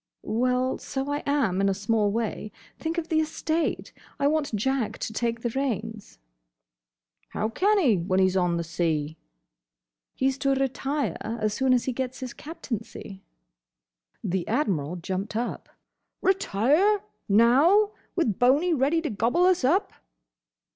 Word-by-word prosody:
"Well, 250 Hz, +3 st, 0 dB
so 270 Hz, +1 st, -4 dB
I 290 Hz, -, -1 dB
am, 275 Hz, -10 st, +1 dB
in 195 Hz, -, +3 dB
a 195 Hz, -, 0 dB
small 210 Hz, +1 st, +1 dB
way. 215 Hz, -1 st, -3 dB, 0.3 s
Think 325 Hz, +1 st, -3 dB
of 335 Hz, -1 st, -3 dB
the 315 Hz, -, +2 dB
estate! 315 Hz, +1 st, -2 dB, 0.3 s
I 280 Hz, -, +1 dB
want 295 Hz, -4 st, +1 dB
Jack 260 Hz, +2 st, -1 dB
to 220 Hz, -, -5 dB
take 230 Hz, +1 st, -1 dB
the 235 Hz, -, -2 dB
reins." 225 Hz, -5 st, -3 dB, 1.2 s
"How 215 Hz, -, -1 dB
can 405 Hz, -, +2 dB
he, 260 Hz, -, +4 dB
when 185 Hz, +2 st, 0 dB
he 190 Hz, -, +5 dB
's 185 Hz, -, -2 dB
on 180 Hz, -2 st, +2 dB
the 170 Hz, -, -1 dB
sea?" 160 Hz, -2 st, -1 dB, 1.0 s
"He's 265 Hz, +1 st, 0 dB
to 275 Hz, -1 st, +2 dB
retire 270 Hz, -, -1 dB
as 215 Hz, -1 st, -2 dB
soon 265 Hz, +2 st, +1 dB
as 250 Hz, -2 st, +3 dB
he 260 Hz, -, -1 dB
gets 260 Hz, 0 st, -4 dB
his 255 Hz, -2 st, -6 dB
Captaincy." 230 Hz, -, -7 dB, 1.0 s
The 185 Hz, -1 st, -2 dB
Admiral 175 Hz, -, 0 dB
jumped 185 Hz, +4 st, -4 dB
up. 240 Hz, +2 st, -3 dB, 0.5 s
"Retire! 380 Hz, -, +3 dB, 0.3 s
Now! 280 Hz, -, +5 dB, 0.2 s
With 235 Hz, -, 0 dB
Boney 285 Hz, +8 st, +4 dB
ready 305 Hz, +4 st, +1 dB
to 305 Hz, -, -1 dB
gobble 235 Hz, -, +2 dB
us 365 Hz, -5 st, +3 dB
up!" 345 Hz, +10 st, +2 dB
250 Hz, 145 wpm, -26 LUFS, 205-295 Hz, 1.2 s, he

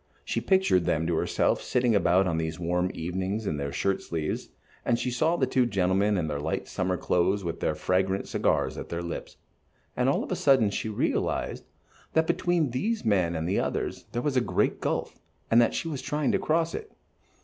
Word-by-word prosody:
She -, -, -1 dB
pictured 190 Hz, -, +3 dB
them 80 Hz, -2 st, +1 dB
to 85 Hz, 0 st, 0 dB
herself -, -, +1 dB
sitting 125 Hz, -2 st, +1 dB
about 95 Hz, -2 st, +4 dB
on 80 Hz, -3 st, 0 dB
these 80 Hz, 0 st, -3 dB
warm 90 Hz, +1 st, 0 dB
evenings 95 Hz, +6 st, -3 dB
in 80 Hz, -6 st, -1 dB
their 70 Hz, 0 st, -3 dB
shirt 95 Hz, +7 st, 0 dB
sleeves, 80 Hz, -2 st, -3 dB, 0.3 s
and 115 Hz, -, +2 dB
she 125 Hz, +1 st, -2 dB
saw 155 Hz, +7 st, +2 dB
the 140 Hz, -, +2 dB
two 130 Hz, -1 st, +2 dB
gentlemen 100 Hz, 0 st, +2 dB
in 85 Hz, -, 0 dB
their 75 Hz, -2 st, -2 dB
light 75 Hz, +3 st, -2 dB
summer 90 Hz, 0 st, -1 dB
clothes 95 Hz, +4 st, +1 dB
with 85 Hz, -1 st, -4 dB
their 75 Hz, -, 0 dB
fragrant 95 Hz, +4 st, 0 dB
cigars -, -, 0 dB
at -, -, -7 dB
their 85 Hz, 0 st, -3 dB
lips, 85 Hz, -, -6 dB, 0.6 s
and -, -, +2 dB
all -, -, +1 dB
of -, -, -7 dB
a -, -, +1 dB
sudden 125 Hz, -7 st, +4 dB
she 110 Hz, -, -3 dB
realized 105 Hz, -, -1 dB, 0.5 s
that 160 Hz, 0 st, +3 dB
between 170 Hz, -5 st, +1 dB
these 210 Hz, -, -1 dB
men 90 Hz, -6 st, +2 dB
and 80 Hz, +1 st, -2 dB
the 95 Hz, -, +1 dB
others -, -, -2 dB
there 120 Hz, +1 st, -2 dB
was 145 Hz, -3 st, 0 dB
a 125 Hz, -, +4 dB
great -, -, 0 dB
gulf, -, -, -2 dB, 0.3 s
and 115 Hz, +1 st, +7 dB
that 115 Hz, -, +2 dB
she -, -, -2 dB
was 145 Hz, -5 st, -4 dB
trying 150 Hz, -1 st, 0 dB
to -, -, +1 dB
cross 165 Hz, +1 st, +1 dB
it. 435 Hz, -, -6 dB
100 Hz, 205 wpm, -27 LUFS, 85-125 Hz, 0.6 s, and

